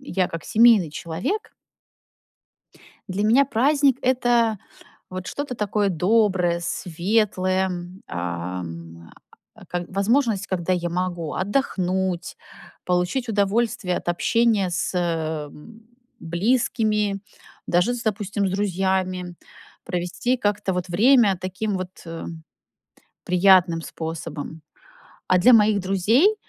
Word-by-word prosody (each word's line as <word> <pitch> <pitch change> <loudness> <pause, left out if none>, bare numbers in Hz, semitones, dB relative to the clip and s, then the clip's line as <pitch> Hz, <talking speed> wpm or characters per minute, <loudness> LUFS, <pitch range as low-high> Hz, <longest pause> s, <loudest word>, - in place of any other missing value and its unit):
я 190 -9 -1
как 165 -1 -7
семейный 220 -7 +5
человек 175 - -4 1.6
Для 190 +2 -2
меня 240 +6 +5
праздник- 275 +1 +2
это 240 -4 +2 0.5
вот 185 0 -6
что-то 285 -3 -4
такое 210 -1 0
доброе, 185 -1 +2
светлое, 185 +2 0
м, 180 +1 -7
ам, 85 -1 -6 0.4
а, - - -16
к 175 0 -3
возможность, 210 +1 +1
когда 185 -1 -1
я 175 -1 -1
могу 175 -2 -3
отдохнуть, 190 -4 -1 0.5
получить 180 +8 -1
удовольствие 210 -1 0
от - - -4
общения 210 +2 +2
с, 175 +2 -2
эм, 160 +4 -4 0.4
близкими, 210 +2 0 0.5
даже 180 +8 +2
с, 245 -1 -5
допустим, 205 -1 -1
с - - -2
друзьями, 190 -2 -1 0.5
провести 180 +8 -1
как-то 205 -3 -1
вот 180 0 -3
время 215 +1 +4
таким 190 +3 -3
вот, 185 -1 -5 0.2
э, 165 0 -7 1.0
приятным 180 -2 +4
способом. 160 -1 -6 0.7
А 185 - +4
для 220 +8 +6
моих 210 -2 +5
друзей, 205 - +3
190 Hz, 105 wpm, -23 LUFS, 175-220 Hz, 1.6 s, для